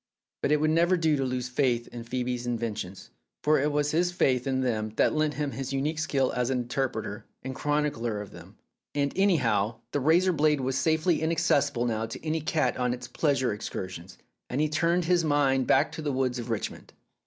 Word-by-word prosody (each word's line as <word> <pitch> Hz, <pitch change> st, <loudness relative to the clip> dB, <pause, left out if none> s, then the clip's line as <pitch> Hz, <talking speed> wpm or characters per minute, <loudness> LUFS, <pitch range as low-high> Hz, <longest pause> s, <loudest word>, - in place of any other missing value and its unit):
But -, -, +1 dB
it 150 Hz, -, +4 dB
would 155 Hz, +1 st, +2 dB
never 170 Hz, +3 st, +3 dB
do 160 Hz, -3 st, +2 dB
to 135 Hz, -, 0 dB
lose 125 Hz, -1 st, -2 dB
faith 125 Hz, -2 st, 0 dB
in 120 Hz, -1 st, -7 dB
Phoebe's 125 Hz, 0 st, -3 dB
inventions, 110 Hz, -5 st, -4 dB, 0.3 s
for 155 Hz, 0 st, +4 dB
it 150 Hz, +2 st, +1 dB
was 145 Hz, 0 st, +1 dB
his 175 Hz, +3 st, +2 dB
faith 130 Hz, -7 st, +1 dB
in 130 Hz, -1 st, +1 dB
them 110 Hz, -4 st, -1 dB
that -, -, +3 dB
lent 155 Hz, -1 st, 0 dB
him 145 Hz, -1 st, -2 dB
his 135 Hz, 0 st, -5 dB
unique 150 Hz, +3 st, -1 dB
skill 135 Hz, -4 st, +1 dB
as 125 Hz, 0 st, -1 dB
interpreter 120 Hz, -4 st, -2 dB, 0.2 s
and 130 Hz, +1 st, -4 dB
chronicler 145 Hz, -7 st, -1 dB
of 105 Hz, -1 st, -8 dB
them. -, -, -13 dB, 0.4 s
And, 140 Hz, -1 st, 0 dB
any 195 Hz, -1 st, +4 dB
how, 115 Hz, -4 st, 0 dB
the 145 Hz, -, 0 dB
razor 170 Hz, +6 st, +4 dB
blade 150 Hz, -2 st, +3 dB
was 130 Hz, 0 st, -1 dB
safely 160 Hz, +4 st, +2 dB
inaccessible 145 Hz, -6 st, +1 dB
now 115 Hz, -1 st, -1 dB
to -, -, -8 dB
any 160 Hz, 0 st, 0 dB
cat 155 Hz, -4 st, 0 dB
on 125 Hz, -1 st, 0 dB
its 125 Hz, -1 st, -9 dB
pleasure 135 Hz, -7 st, +1 dB
excursions, 95 Hz, -4 st, -6 dB, 0.3 s
and 125 Hz, -, -2 dB
he 155 Hz, 0 st, +2 dB
turned 170 Hz, +3 st, +1 dB
his 175 Hz, 0 st, +3 dB
mind 140 Hz, -4 st, +2 dB
back -, -, +3 dB
to -, -, -6 dB
the 150 Hz, -2 st, -1 dB
woods 130 Hz, -2 st, 0 dB
of 120 Hz, 0 st, -6 dB
Richmond. 115 Hz, -2 st, -4 dB
135 Hz, 200 wpm, -28 LUFS, 120-155 Hz, 0.4 s, it